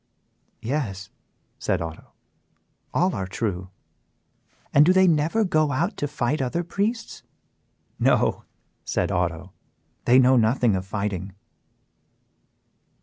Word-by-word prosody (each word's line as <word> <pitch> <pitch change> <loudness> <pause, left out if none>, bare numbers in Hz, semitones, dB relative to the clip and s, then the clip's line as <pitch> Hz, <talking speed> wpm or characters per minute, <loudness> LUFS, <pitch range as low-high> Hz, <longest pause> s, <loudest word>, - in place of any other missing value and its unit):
"Yes," 110 -7 -3 0.5
said - - 0
Otto, 80 -1 -8 0.8
"all 180 +2 +1
are 95 -3 -3
true." 95 -2 -3 1.0
"And 145 - +7
do 180 +4 +5
they 190 0 +5
never 165 +7 +2
go 155 -5 +2
out 170 - -1
to 145 - -1
fight 140 0 -1
other 135 +7 -1
priests?" 210 +6 -3 0.8
"No," - - +2 0.4
said - - -1
Otto, - - -2 0.5
"they 125 - +6
know 130 0 +5
nothing 115 -1 +3
of 95 0 -4
fighting." 100 -2 -3
130 Hz, 110 wpm, -24 LUFS, 100-165 Hz, 1.0 s, And